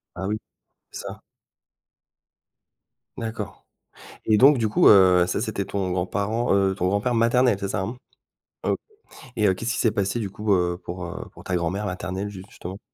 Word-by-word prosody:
Ah 95 +1 -4
oui, 105 +1 -1 0.5
c'est - - -7
ça. - - -8 2.0
D'accord. 110 -3 -6 0.6
Et 110 -1 +4
donc 135 +4 +7
du 110 -3 0
coup, 105 - +4
heu, 90 -3 +7
ça 90 - -1
c'était 110 -4 -2
ton 95 -2 -2
grand-parent, 100 +6 0
heu, 95 -1 +2
ton 90 -1 0
grand-père 100 +5 0
maternel 120 0 +3
c'est 100 - -2
ça, - - -1
hein? 115 +6 -4 0.7
OK - - +1 0.6
et 105 -3 +2
heu, 95 - +4
qu'est-ce 115 +5 -3
qui - - -3
s'est 115 - +3
passé 100 +2 -1
du 105 -4 -3
coup, 105 +1 0
heu, 90 -1 +1
pour, 90 0 -6
heu, 85 +1 -7
pour - - -13
ta 90 - -1
grand-mère 90 +5 -1
maternelle 95 +1 -4
ju 95 -2 -9
justement? 95 +3 -8
100 Hz, 180 wpm, -24 LUFS, 95-110 Hz, 2.0 s, donc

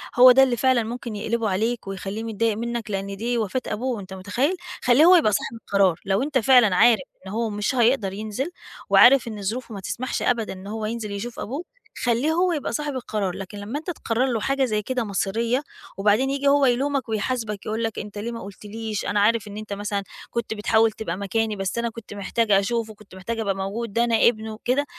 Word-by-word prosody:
هو 250 +1 +9
ده 265 +2 +7
اللي 250 -3 +1
فعلًا 255 -1 +3
ممكن 235 0 -5
يقلِبه 220 +1 -1
عليك 220 +4 -1
ويخلّيه 195 +3 -5
متضايق 225 -1 0
منك 235 -1 -4
لأن 195 0 -3
دي 240 +3 -1
وفاة 225 +3 -1
أبوه، 245 0 -2
أنت 190 -1 -9
متخيّل! 220 - -1 0.3
خلّيه 250 +6 +6
هو 365 +2 +8
يبقى 315 -11 +4
صاحب 215 +2 -2
القرار، 200 -6 +1
لو 195 +5 +1
أنت 285 -1 0
فعلًا 245 -5 +5
عارف 230 +5 +5 0.3
إن - - -6
هو 225 +2 -1
مش 210 +5 -1
هيقدَر 235 -5 +2
ينزِل 215 - -4 0.4
وعارف 260 -1 +7
إن 215 -2 -6
ظروفه 225 +4 -4
ما 200 - -6
تسمحش 240 +6 -3
أبدًا 235 -3 0
إن 190 +1 -10
هو 215 +1 -4
ينزِل 220 -1 -4
يشوف 225 +4 -5
أبوه، 280 +9 -4 0.4
خلّيه 245 +5 +2
هو 355 +3 +2
يبقى 295 -4 -2
صاحب 295 -1 -2
القرار، 210 -7 -2
لكن 195 +1 -7
لمّا 210 +8 -4
أنت 315 - -8
تقرّر 245 -6 -1
له 230 - 0
حاجة 270 +4 +1
زي 215 -3 0
كده 250 +3 -2
مصيرية 225 +5 -1 0.3
وبعدين 210 +6 +3
ييجي 280 +1 -1
هو 280 0 +5
يلومك 270 +1 +1
ويحاسبك 220 -1 -2
يقُول 220 +2 -2
لك 225 -1 -2
أنت 210 0 -8
ليه 220 +3 -3
ما 230 - -6
قُلتليش، 210 +2 -6
أنا 205 - +1
عارف 215 +1 +2
إن 205 0 -8
أنت 215 -1 -6
مثلًا 200 0 -2 0.3
كنت 235 -2 -3
بتحاول 220 +1 +3
تبقى 210 -5 -5
مكاني، 215 +2 -1
بس 195 +2 -3
أنا 235 0 0
كنت 230 -2 -10
محتاج 210 +2 -1
أشوفه، 220 +3 +1
كنت 205 -2 -17
محتاج 225 +5 -4
أبقى 200 -3 0
موجود، 200 +3 -4
ده 235 - +3
أنا 235 -1 +2
ابنه 220 -2 0
وكده، 250 +6 0
225 Hz, 210 wpm, -24 LUFS, 205-245 Hz, 0.4 s, هو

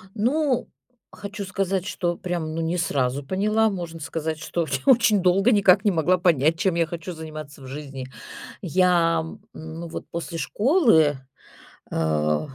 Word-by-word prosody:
Ну, 255 +3 +1 0.4
хочу 205 0 -7
сказать, 195 -1 -1
что 175 -4 -1
прям, 170 -3 -3
ну, 165 - -2
не 165 +2 -1
сразу 140 -5 0
поняла. 215 +8 +1
Можно 170 -4 -6
сказать, 160 0 -3
что 165 +1 -2 0.2
очень 225 -5 +5
долго 190 +6 +3
никак 195 -1 +5
не 205 - +4
могла 180 +1 +2
понять, 165 -3 +2
чем 190 -3 +1
я 170 -1 +2
хочу 170 +2 -6
заниматься 155 -3 -9
в 130 - -10
жизни. 135 -1 -7 0.6
Я, 175 -2 +3
м, 160 +6 -9
ну, 160 +2 -8
вот, 165 - -7
после 170 0 -5
школы, 205 - +3 0.7
э, 75 -1 +1
170 Hz, 150 wpm, -24 LUFS, 155-195 Hz, 0.7 s, очень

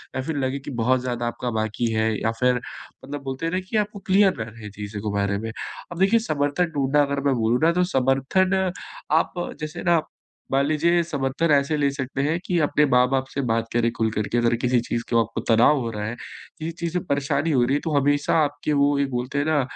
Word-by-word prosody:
या 130 - -1
फिर 145 +2 -3
लगे 135 +1 -1
की 140 - -8
बहुत 130 +1 +2
ज़्यादा 120 -1 -2
आपका 120 +1 -3
बाकी 110 +2 -1
है 110 0 +1
या 110 - +1
फिर 125 0 +3
मतलब 140 +3 -9
बोलते 135 +4 -4
हैं 165 - -3
ना 185 - +1
कि 220 - 0
आपको 210 -1 -1
क्लियर 195 -1 +5
रह 110 +1 -4
रहें 110 -1 -10
चीज़ों 105 0 -7
के 105 -1 -3
बारे 100 0 0
में। 115 +1 -5 0.4
अब 175 - -7
देखिए, 200 +4 +4
समर्थन 155 -3 0
ढूँढना 140 +1 +2
अगर 140 0 -1
मैं 135 -2 +3
बोलूँ 115 +1 +1
ना 165 - +5
तो 180 +1 +2
समर्थन 185 +9 +2 0.4
आप 160 +1 +2 0.3
जैसे 155 0 -5
ना 165 - +4 0.5
मान 135 +1 +3
लीजिए 165 +3 +2
समर्थन 150 0 -1
ऐसे 140 +1 +3
ले 140 -1 +2
सकते 135 0 -3
हैं 160 +3 +1
कि 175 - 0
अपने 150 0 +3
माँ-बाप 125 +1 +3
से 140 - -1
बात 115 0 +1
करें 120 -1 +2
खुल 110 -1 +1
कर 105 -1 -2
के 120 - +1
अगर 120 0 +2
किसी 125 -1 +3
चीज़ 120 0 -3
को 115 - +3
आपको - - -3
तनाव 120 +6 +5
हो 115 - -3
रहा 105 -1 -4
है, 120 - -4 0.4
किसी 160 +2 -3
चीज़ 170 0 -3
से 180 - +1
परेशानी 140 +2 0
हो 130 -4 +3
रही 130 +3 +1
है 145 - +1
तो 160 - -1
हमेशा 145 +2 +2
आपके 145 +1 -2
वो 140 0 +3
ये 140 - +2
बोलते 125 +3 -3
हैं 145 - +1
ना, 155 -3 +2
140 Hz, 235 wpm, -23 LUFS, 120-155 Hz, 0.5 s, क्लियर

